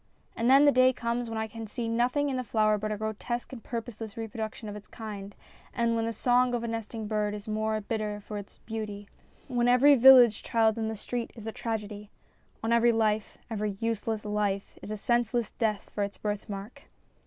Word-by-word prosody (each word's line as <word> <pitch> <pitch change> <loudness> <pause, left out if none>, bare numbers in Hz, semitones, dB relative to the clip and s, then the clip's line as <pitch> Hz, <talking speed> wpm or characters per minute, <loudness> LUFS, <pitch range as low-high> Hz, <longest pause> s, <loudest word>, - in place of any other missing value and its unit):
And 230 +2 +1
then 275 +2 +7
the 290 - +7
day 255 0 +5
comes 235 0 -2
when 225 - -4
I 220 - -1
can 225 0 -8
see 230 +2 -4
nothing 245 +5 +1
in - - -2
the 255 - -1
flower 215 -2 +2
but 215 +1 -3
a 210 - -2
grotesque 220 +4 -4
and 235 - -9
purposeless 225 -3 -6
reproduc 220 -1 -4
tion 220 - -9
of 205 - -6
its 210 0 -10
kind, 205 -3 -8 0.4
when 230 -1 +1
the - - -1
song 245 +2 +2
of 235 - -2
the - - -2
nesting 225 -1 -4
bird 210 -1 -1
is 205 0 -8
the 215 - -5
more 215 0 0
bitter 210 -1 -3
for 210 0 -6
its 200 - -12
beauty, 210 -2 -5 0.4
when 245 -2 +1
every 250 +4 +7
village 250 -4 +8
child 225 -1 +2
in 220 - -1
the 220 - -3
street 235 +3 -4
is 225 -3 -10
a 225 - -3
tragedy. 210 -2 -5 0.5
On 225 +1 +1
every 235 0 +5
life 220 -2 0
every 210 -3 -3
useless 225 -1 -2
life 205 -2 -1
is - - -8
a 215 - -3
senseless 240 +1 0
death 215 -3 -2
for 205 - -2
its 200 -1 -5
birthmark. 205 0 -5
220 Hz, 210 wpm, -29 LUFS, 210-235 Hz, 0.5 s, village